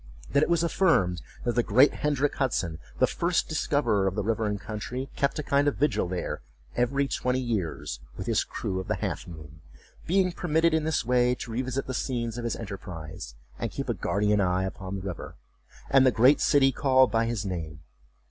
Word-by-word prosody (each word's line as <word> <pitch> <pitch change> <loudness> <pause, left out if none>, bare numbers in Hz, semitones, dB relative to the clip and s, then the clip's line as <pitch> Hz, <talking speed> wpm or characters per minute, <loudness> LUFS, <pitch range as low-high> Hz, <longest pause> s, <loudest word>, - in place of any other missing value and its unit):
That 140 - +3
it - - +2
was 170 -1 +2
affirmed 160 - +2 0.2
that 120 - +1
the 120 - +2
great 125 +6 +5
Hendrick 145 -1 0
Hudson, 95 - -1 0.2
the - - +5
first 170 0 0
discoverer 120 -10 +1
of 95 - -1
the 105 - -1
river 110 +1 0
and 105 -1 -2
country, 120 +6 -5
kept 140 +2 0
a 155 - -2
kind 140 +1 +2
of 145 - +2
vigil 145 -9 +1
there 90 0 -3 0.3
every 140 +3 +1
twenty 125 -1 0
years, 100 - -3 0.2
with - - -5
his - - +1
crew 95 - -4
of 95 - -6
the - - 0
Half - - -4
moon; 80 -2 -11 0.5
being 185 +1 +3
permitted 165 -1 +1
in 160 -1 +1
this 160 -6 0
way 125 0 +3
to 120 - -7
revisit 130 +3 -2
the 130 - -4
scenes 120 -2 -2
of 120 - -4
his 115 - -1
enterprise, 85 - -7 0.2
and - - -2
keep - - -5
a - - +2
guardian 105 0 +1
eye 90 0 +1
upon 95 0 -5
the 95 - -5
river, 95 -3 -6 0.5
and 135 -1 +5
the 130 - +6
great 125 +5 +5
city 135 -2 +4
called 130 -2 +4
by 115 0 +2
his 115 -4 -2
name. 80 -4 -5
120 Hz, 200 wpm, -27 LUFS, 95-140 Hz, 0.5 s, the